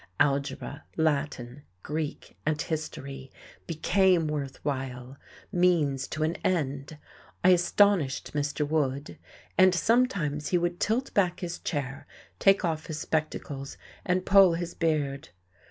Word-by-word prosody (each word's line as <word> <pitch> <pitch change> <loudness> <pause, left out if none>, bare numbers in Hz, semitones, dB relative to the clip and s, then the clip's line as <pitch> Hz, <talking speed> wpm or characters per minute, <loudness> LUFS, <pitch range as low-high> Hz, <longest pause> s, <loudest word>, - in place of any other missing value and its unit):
Algebra, 140 +1 0
Latin, 145 -4 -1 0.2
Greek 150 0 -4
and 155 0 0
history 140 -5 -5 0.4
became 175 +1 +3
worth 140 -3 -3
while, 130 -2 -4 0.4
means 160 -7 +2
to 155 - -3
an 160 +2 0
end. 145 -4 -2 0.5
I 185 - +6
astonished 180 -4 +3
Mr. 145 0 -1
Wood; 145 -2 -1 0.4
and 185 -1 +6
sometimes 175 - +1
he 180 - +2
would 175 0 -1
tilt 245 +5 0
back 180 -3 +1
his 175 -1 -4
chair, 140 -3 -4 0.3
take 195 0 +4
off 160 -2 -2
his 155 -2 -4
spectacles 150 -3 -3 0.3
and 180 +1 0
pull 195 -3 +6
his 175 0 -4
beard. 150 -5 -1
155 Hz, 120 wpm, -28 LUFS, 140-175 Hz, 0.5 s, I